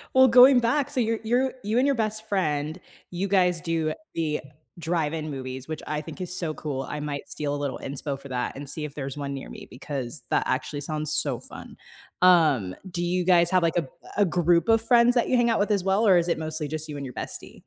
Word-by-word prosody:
well, 260 -1 +7
going 250 +2 +8
back, 280 +4 +1
so 260 -4 0
you're 225 0 0
you're 250 +4 +1
you 215 +3 -1
and 260 - +4
your 280 - +3
best 220 -2 -2
friend, 155 -3 -1 0.3
you 185 +3 -2
guys 180 -3 +2
do 165 -2 -1 0.2
the 155 -2 -1 0.4
drive-in 160 -1 -2
movies, 130 -1 -6
which 155 - -5
I 150 0 -2
think 160 +4 -9
is 180 0 -4
so 160 -3 -2
cool, 140 -4 -4
I 150 0 -4
might 145 -1 -5
steal 145 -1 -3
a - - -2
little 140 -2 -3
inspo 140 0 -4
for 140 - -12
that 125 -1 -3
and 140 0 -8
see 150 +1 -4
if 145 - -9
there's 135 -1 -5
one 140 -1 -4
near 135 - -7
me - - -10
because 130 0 -6
that - - +2
actually 145 +2 -2
sounds 155 +1 -3
so 140 -6 0
fun. - - -11 0.5
Um, 155 - +4
do 175 0 -3
you 180 0 0
guys 175 -2 +5
have, 185 -2 +3
like, 165 0 +1
a - - +4
b - - -12 0.3
a 205 - +5
group 170 +2 +2
of 225 0 +5
friends 240 +1 +4
that 240 - +2
you 255 - +3
hang 240 -1 +3
out 225 - +2
with 205 +1 +1
as 200 -3 +1
well, 195 +3 +2
or 185 -2 +6
is 170 0 +1
it - - +1
mostly 155 -1 -3
just 155 0 -2
you 150 - -6
and 140 -1 -5
your 125 - -8
bestie? - - -8
165 Hz, 245 wpm, -25 LUFS, 145-200 Hz, 0.5 s, going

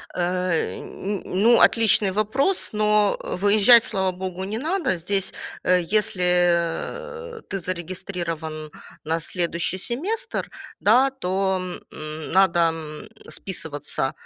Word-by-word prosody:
Э, 180 -1 -1
н 200 +1 -5
н - - -14
ну, 220 +6 +3
отличный 215 -3 +4
вопрос. 260 - +1
Но 210 -1 +2
выезжать, 210 +4 +5
слава 190 -6 0
богу, 185 0 -6
не 215 +3 -4
надо. 320 - -1
Здесь, 195 +3 0 0.3
э, 180 0 +4 0.2
если 180 - -1
ты 195 - -3
зарегистрирован 170 -3 -5 0.4
на 165 +1 0
следующий 170 +1 -1
семестр, 390 - -3 0.3
да, 250 +6 +4
то, 190 -6 -1 0.4
м, 155 0 -7
надо, 185 -2 +4
м, 160 +2 -2 0.2
списываться 145 -7 -2
190 Hz, 110 wpm, -23 LUFS, 170-215 Hz, 0.4 s, выезжать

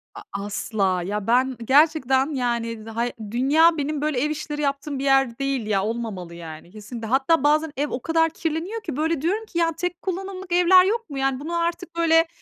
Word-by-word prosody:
A 410 - -8 0.2
asla! 195 -3 -1
Ya, 205 +2 -3
ben 255 +2 +2
gerçekten 280 0 +3
yani 235 -4 -2
da 225 0 -9
hay 240 +1 0 0.2
dünya 310 +7 +4
benim 290 0 -2
böyle 300 -4 0
ev 300 - +1
işleri 300 0 -4
yaptığım 280 0 -2
bir - - -3
yer 270 -3 +2
değil 270 -5 -1
ya, 195 -2 +1
olmamalı 210 -7 -4
yani, 165 0 -10
kesinlikle. 220 +2 -8
Hatta 270 +5 +2
bazen 305 +1 +3
ev 295 +1 0
o 250 - -4
kadar 325 +2 +2
kirleniyor 330 +7 -4
ki 350 - -5
böyle 320 -1 0
diyorum 405 +8 -1
ki 345 - -7
"Ya, 330 -1 +2
tek 355 0 -3
kullanımlık 380 0 -5
evler 360 +1 +6
yok 455 -1 -1
mu?" 280 - -6
Yani 270 -1 0
bunun 320 +4 -5
artık 340 +1 -2
böyle 330 0 +4
285 Hz, 200 wpm, -23 LUFS, 235-330 Hz, 0.2 s, evler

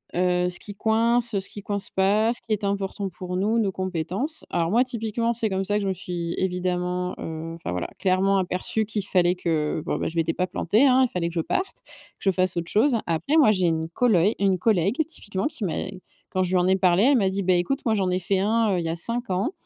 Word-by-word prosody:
heu, 180 0 +2
ce 175 - -3
qui 205 - -8
coince, 230 +1 +2
ce 190 - -3
qui 205 - -8
coince 200 -1 -3
pas, 210 +4 +2
ce - - -8
qui 230 -2 -2
est 210 - -2
important 200 0 -2
pour 180 0 -6
nous, 220 +4 +1
nos 200 -3 +1
compétences. 185 - -3
Alors 170 +1 0
moi, 240 +3 +4
typiquement, 230 -1 -2
c'est 225 -1 0
comme 190 0 -1
ça 205 +1 0
que 205 - -2
je - - -1
me 190 - +1
suis 175 -2 -4
évidemment, 180 0 -1
heu 165 +1 -6
enfin 165 - -6
voilà, 90 -1 -3
clairement 195 +1 +2
aperçu 185 +4 0
qu'il 210 -2 -3
fallait 180 -2 +2
que 160 -3 -1
bon - - -1
bah, - - -2
je 165 - -10
m'étais 165 0 +1
pas 185 - -1
plantée 205 +7 +2
hein, 260 0 +5
il - - +3
fallait 170 -2 -2
que 170 - -11
je 165 - +1
parte, 375 - -2
que - - -10 0.3
je 195 - +2
fasse 185 -1 0
autre 170 0 -3
chose. 235 +4 +3
Après, 170 - +1
moi, 275 -9 +6
j'ai 185 -4 +2
une 160 0 -1
coloï 205 -1 +3
une 195 -2 +2
collègue 220 - +1
typiquement 205 - -3
qui 225 -9 -5
m'a 165 - -2 0.6
quand 185 - 0
je 180 - -1
lui 185 - +3
en 180 0 +2
ai 190 0 +3
parlé, 185 +1 +3
elle 275 -1 +5
m'a 195 -3 +2
dit: 195 0 -2
«Beh, 180 -1 +3
écoute, 270 +10 -1
moi, 225 - +2
j'en 190 -2 0
ai 185 - +1
fait 190 +1 0
un, 215 0 +2
heu, 180 - 0
il 170 - -3
y 165 - -1
a 165 - -1
cinq 235 +5 -3
ans» 190 - 0
190 Hz, 255 wpm, -24 LUFS, 180-220 Hz, 0.6 s, moi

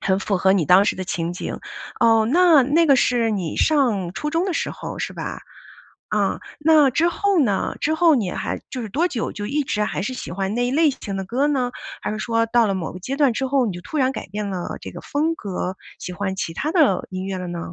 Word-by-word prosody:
很 190 0 +1
符 200 0 -1
合 190 +1 +4
你 190 -4 +2
当 180 +7 +6
时 - - +1
的 185 - -4
情 170 -1 -2
景。 175 - -5 0.4
哦， 225 -1 +4
那 335 -3 +6
那 315 +6 +3
个 280 - +6
是 240 -3 +2
你 185 -7 -3
上 230 - +2
初 300 +9 -3
中 330 +3 +1
的 380 - -1
时 - - -1
候， - - -7
是 - - -3
吧？ - - -6 0.7
啊， - - +1 0.2
那 305 -2 +5
之 330 +7 +2
后 390 0 +1
呢， 205 -8 0
之 315 - +1
后 330 -1 +5
你 210 -9 0
还 - - -4
就 255 - -4
是 220 - -5
多 320 - +1
久， 235 -9 -3
就 205 - -6
一 285 +5 -1
直 210 -5 -1
还 - - -3
是 255 +6 -3
喜 - - -7
欢 195 +3 -2
那 245 +1 +1
一 - - -1
类 310 +4 +4
型 200 -6 -6
的 195 - -3
歌 255 +9 0
呢？ 255 -4 0 0.3
还 210 - -3
是 215 - -4
说 230 0 +1
到 235 0 +3
了 195 - 0
某 170 -4 -4
个 180 - -9
阶 260 +9 -4
段 280 -4 +3
之 265 - -2
后， 265 -2 +2
你 205 - -2
就 175 - -7
突 305 - -4
然 265 -1 +2
改 - - -6
变 205 +2 -4
了 180 -2 -4
这 - - -8
个 - - -8
风 310 +3 -1
格， 190 - -4 0.2
喜 180 - -6
欢 190 +1 -3
其 165 -3 -3
他 295 - -2
的 295 - +3
音 185 0 -4
乐 195 -1 -3
了 180 -1 -5
呢？ 175 0 -5
230 Hz, 275 characters per minute, -22 LUFS, 190-290 Hz, 0.7 s, 当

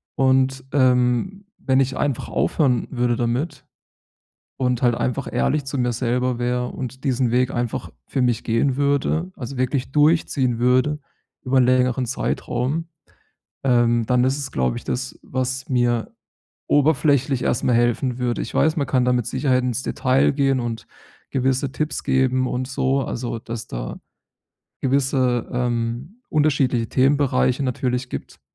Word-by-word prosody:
Und, 130 0 +2
ähm, 130 - +2
wenn 130 -1 +2
ich 135 0 +1
einfach 140 -5 -1
aufhören 130 -7 +1
würde 120 -2 0
damit 120 +7 -2 0.9
und 125 -2 0
halt 120 -2 +3
einfach 130 +2 -2
ehrlich 145 -2 0
zu 135 0 -4
mir 125 -1 +1
selber 125 +1 -1
wäre 125 0 -1
und 130 +1 -7
diesen 130 -3 +1
Weg 125 +1 +2
einfach 120 -1 -3 0.2
für 135 - -1
mich 120 -2 +1
gehen 125 +4 +1
würde, 145 +5 0
also, 130 +1 -7
wirklich 130 +1 -1
durchziehen 145 -5 +2
würde 130 +5 +2 0.4
über 130 0 +1
'n 125 - +5
längeren 125 0 +2
Zeitraum, 135 +5 -2 0.8
ähm, 120 -3 +3
dann 125 -1 +3
ist 135 +3 +1
es, 135 -2 -5
glaube 65 -2 0
ich, - - -8
das, 130 +1 -4
was 130 +1 -3
mir 120 -3 +1 0.6
oberflächlich 140 -3 +2
erstmal 120 0 +1
helfen 120 +1 +1
würde. 120 -1 -1
Ich - - -6
weiß, 160 +1 +2
man 140 - 0
kann 125 -2 +2
da 125 - +3
mit 120 -3 0
Sicherheit 130 -3 +1
ins 125 0 -2
Detail 130 +2 +2
gehen 135 -2 +2
und 115 -2 -4 0.4
gewisse 130 +1 0
Tipps 155 +1 -3
geben 130 -1 +2
und 125 0 -2
so, 135 0 0
also, 120 -1 -4
dass 115 0 -7
da - - -6 0.8
gewisse, 130 -3 +1
ähm, 120 - -2
unterschiedliche 135 -6 +1
Themenbereiche 135 0 +2
natürlich 125 0 -2
gibt. - - -7
130 Hz, 145 wpm, -22 LUFS, 120-135 Hz, 0.9 s, n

